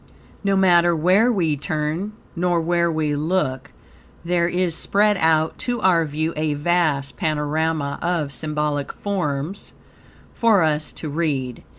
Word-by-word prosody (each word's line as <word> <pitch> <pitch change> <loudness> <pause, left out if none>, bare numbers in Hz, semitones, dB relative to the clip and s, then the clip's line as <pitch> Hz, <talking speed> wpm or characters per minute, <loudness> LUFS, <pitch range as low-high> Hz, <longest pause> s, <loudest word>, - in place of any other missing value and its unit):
No 200 -1 +2
matter 175 -3 +4
where 185 +9 +3
we 170 -9 +1
turn 155 +7 -3 0.2
nor 175 0 +1
where 170 +1 +1
we 155 -2 -1
look, 145 -4 -1 0.5
there 170 0 +1
is 180 -1 0
spread 210 +3 +2
out 160 -1 +1
to 245 -1 -2
our 170 -3 +3
view 155 +2 -2
a 155 -1 -1
vast 150 -3 0
panorama 155 -2 -1
of 165 -5 -1
symbolic 150 0 -2
forms 180 -2 -4 0.6
for 220 -6 +3
us 155 -1 0
to 160 - -7
read. 140 -5 -2
160 Hz, 130 wpm, -22 LUFS, 150-180 Hz, 0.6 s, matter